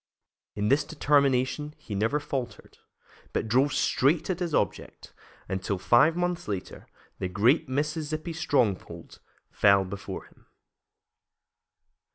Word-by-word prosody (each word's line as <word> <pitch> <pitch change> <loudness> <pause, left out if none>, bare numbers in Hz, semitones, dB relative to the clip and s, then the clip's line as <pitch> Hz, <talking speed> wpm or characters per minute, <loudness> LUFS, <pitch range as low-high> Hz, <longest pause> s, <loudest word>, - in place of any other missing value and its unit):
In 105 0 -1
this 140 +3 +3
determination 145 0 +1
he 105 - -9
never 110 +9 +1
faltered, 135 -4 -6 0.5
but - - -1
drove 130 +6 +3
straight 150 +9 +1
at 180 - -3
his 175 -2 -2
object 100 - -3 0.3
until, 95 +1 -2
five 120 - +4
months 175 0 -2
later, 100 -3 -6 0.3
the 95 - -2
great 125 - +2
Mississippi 155 +3 -2
stronghold 130 - -1 0.3
fell 100 -1 +4
before 95 +1 -7
him. - - -24
135 Hz, 115 wpm, -27 LUFS, 105-155 Hz, 0.5 s, five